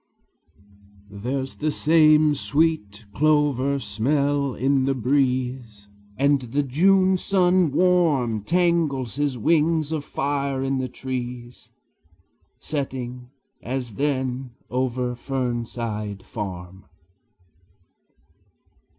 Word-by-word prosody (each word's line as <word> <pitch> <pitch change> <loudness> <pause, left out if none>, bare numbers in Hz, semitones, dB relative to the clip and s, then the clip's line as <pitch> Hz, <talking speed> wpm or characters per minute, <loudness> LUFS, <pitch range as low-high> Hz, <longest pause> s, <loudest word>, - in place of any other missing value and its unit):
There 125 +7 -3
's 135 - -12
the 155 - -2
same 155 0 +4
sweet 145 -9 0
clover 145 -1 +2
smell 140 +4 0
in 135 0 +1
the 135 0 +1
breeze; 125 -4 -1 0.3
And 140 0 +3
the 130 +4 -1
June 185 +7 +3
sun 180 -3 +2
warm 150 - +2
Tangles 160 - 0
his 145 -3 0
wings 160 +4 +2
of 155 -3 -2
fire 140 -1 -2
in 135 0 -1
the 130 -1 -3
trees, 125 -1 -6 0.9
Setting, 125 -4 -5 0.3
as 125 -2 -4
then, 130 -1 -2 0.2
over 125 -1 -1
Fernside 115 -5 -4
farm. 95 -3 -7
135 Hz, 90 wpm, -23 LUFS, 120-150 Hz, 0.9 s, same